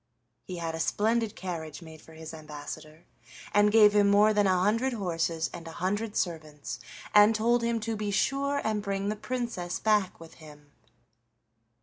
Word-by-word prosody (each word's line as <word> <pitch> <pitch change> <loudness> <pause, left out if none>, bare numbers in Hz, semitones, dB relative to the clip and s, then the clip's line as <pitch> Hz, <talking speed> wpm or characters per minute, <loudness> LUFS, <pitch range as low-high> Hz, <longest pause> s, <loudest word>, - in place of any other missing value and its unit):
He 185 - -6
had 165 -1 -3
a 160 - -5
splendid 220 +5 0
carriage 165 -4 -6
made 160 -1 -12
for 160 - -16
his 160 0 -9
ambassador, 155 +1 -9 0.5
and 205 0 +5
gave 210 -1 +7
him 205 -1 +4
more 210 +2 +5
than 205 -1 +3
a 185 -1 +3
hundred 230 +7 +1
horses 165 -5 -1
and 170 -1 -8
a 165 - -8
hundred 205 +5 -2
servants, 155 -7 -4 0.3
and 210 +1 +7
told 235 +2 +2
him 235 0 0
to 225 +1 -2
be 210 -1 -3
sure 275 +7 0
and 215 -1 -1
bring 200 0 -2
the 210 - -1
Princess 230 -6 -4
back 210 -3 +1
with 165 -1 -12
him. 150 -2 -15
200 Hz, 170 wpm, -28 LUFS, 165-215 Hz, 0.5 s, gave